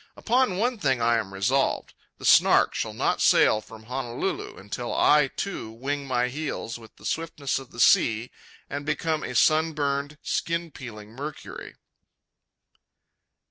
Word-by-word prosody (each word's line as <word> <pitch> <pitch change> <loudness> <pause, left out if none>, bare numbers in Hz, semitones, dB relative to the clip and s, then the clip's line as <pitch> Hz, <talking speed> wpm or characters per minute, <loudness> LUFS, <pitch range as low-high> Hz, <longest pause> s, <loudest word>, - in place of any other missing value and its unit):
Upon 245 -5 +2
one 240 +2 0
thing 135 -6 +1
I 115 0 +3
am 100 -3 -5
resolved: 125 +8 0 0.2
the - - -9
Snark - - +5
shall - - -2
not - - 0
sail 110 - +5
from 110 0 -13
Honolulu 125 +7 -4
until 105 +5 -5
I, 150 -1 +4
too, 175 - -5
wing 140 +5 -4
my 125 -1 +1
heels 130 -4 -4
with 110 -1 -15
the - - -16
swiftness 155 -5 -2
of 135 - -12
the - - -12
sea, 115 0 +4 0.4
and 145 +1 -5
become 155 +1 -1
a - - -5
sun 160 +1 +4
burned, 145 0 -2
skin 170 0 -2
peeling 110 -6 -10
Mercury. 145 +5 -8
135 Hz, 145 wpm, -26 LUFS, 115-155 Hz, 0.4 s, Snark